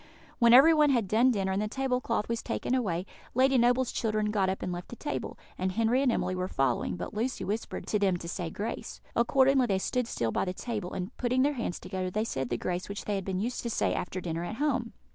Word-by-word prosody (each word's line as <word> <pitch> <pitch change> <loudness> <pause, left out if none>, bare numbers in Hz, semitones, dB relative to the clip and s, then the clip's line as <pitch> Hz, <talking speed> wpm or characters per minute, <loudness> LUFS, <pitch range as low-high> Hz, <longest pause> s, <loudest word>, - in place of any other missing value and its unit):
When 235 -2 +6
everyone 300 +4 +7
had 235 -7 +2
done 230 +6 +4
dinner 195 -5 0
and 190 +2 0
the 210 - -1
table 255 +2 -1
cloth 230 -4 -1
was 230 0 -2
taken - - -2
away, 190 -9 0 0.3
Lady 260 +1 +4
Noble's 245 +1 +3
children 215 -2 0
got 195 -3 +1
up 190 - -3
and 180 - -2
left 175 0 -5
the - - -8
table, 295 - -4 0.2
and 185 0 0
Henry 230 +4 +2
and 270 -3 +3
Emily 185 - 0
were 185 0 -2
following, 135 -6 0
but - - -6
Lucy 235 +5 -2
whispered 210 +4 -3
to 210 - 0
them 190 -3 +2
to 170 - -8
say 175 -1 -3
grace. 210 +7 -5 0.2
Accordingly 265 +2 +4
they 195 -3 +1
stood 245 +5 -1
still 115 - -1
by - - 0
the 180 - -2
table, 210 -3 -4
and, 185 +6 -5
putting 255 +1 +2
their 290 +1 +2
hands 230 -9 -3
together, 185 -1 -3
they 215 +4 -1
said 135 - -3
the 120 - -1
grace 180 +8 -3
which 200 - -5
they 210 - -1
had 195 -2 -2
been 190 -1 -2
used 240 +3 -2
to 235 - -3
say - - +1
after 180 +1 -3
dinner 170 -1 -3
at 195 +5 -4
home. 255 -4 -1
215 Hz, 245 wpm, -29 LUFS, 185-250 Hz, 0.3 s, everyone